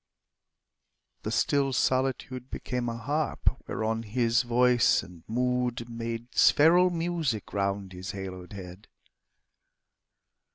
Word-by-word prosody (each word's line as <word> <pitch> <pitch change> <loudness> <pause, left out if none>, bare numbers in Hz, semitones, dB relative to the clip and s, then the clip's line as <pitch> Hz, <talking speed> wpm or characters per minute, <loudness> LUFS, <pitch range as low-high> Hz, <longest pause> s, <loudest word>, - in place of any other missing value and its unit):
The - - -4
still 140 -2 +1
solitude 130 0 0
Became 125 -1 -3
a 115 - -4
harp 145 +5 -1
whereon 110 +1 -1
his 115 +1 +1
voice 120 0 +3
and 90 -3 -13
mood 125 0 -1
Made 115 +1 -5
spheral 175 +5 +6
music 165 - -2
round 100 -1 -2
his 90 +1 -7
haloed 95 -1 -7
head. 95 0 -10
120 Hz, 100 wpm, -28 LUFS, 105-130 Hz, -, spheral